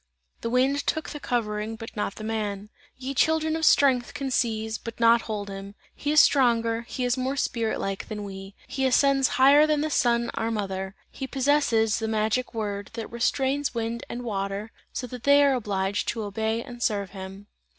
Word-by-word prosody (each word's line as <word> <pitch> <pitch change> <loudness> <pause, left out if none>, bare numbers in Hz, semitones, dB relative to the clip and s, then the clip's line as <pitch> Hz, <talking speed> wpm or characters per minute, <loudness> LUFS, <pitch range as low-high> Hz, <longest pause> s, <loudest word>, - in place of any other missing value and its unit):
The 230 - -2
wind 265 +4 +1
took 315 - -1
the 295 - -6
covering, 220 -4 -2
but 225 0 -9
not 205 -2 -2
the 215 - -8
man. 210 -2 -3 0.3
"Ye 265 +1 -4
children 315 +3 +2
of 320 - -3
strength 260 -5 +4
can 270 -1 -3
seize, 220 -3 0
but 230 0 -8
not 230 0 +5
hold 205 -2 -3
him; 195 0 -8 0.2
he 290 - -2
is 305 - +6
stronger, 230 -5 +4
he 255 - -3
is 245 +1 +1
more 260 +2 -1
spirit 230 -5 -1
like, 195 0 -3
than 210 -1 -5
we; 195 0 -8
he 265 -1 0
ascends 270 +1 +4
higher 280 +3 +7
than 305 -1 +2
the 310 0 -1
Sun, 235 -3 +2
our 225 - -1
mother! 195 -3 -3 0.2
He 265 - -5
possesses 265 -6 +2
the 220 - -2
magic 220 +3 0
word, 205 -2 -3
that 230 -1 -6
restrains 265 +3 0
wind 230 0 -2
and 245 +1 -5
water, 200 -1 -3 0.2
so - - -4
that 250 0 -8
they 285 +2 +6
are 280 -1 +4
obliged 205 -3 -1
to 225 - -2
obey 220 +3 -2
and 245 -3 -10
serve 200 -5 0
him!" 195 +1 -9
230 Hz, 190 wpm, -26 LUFS, 210-265 Hz, 0.3 s, higher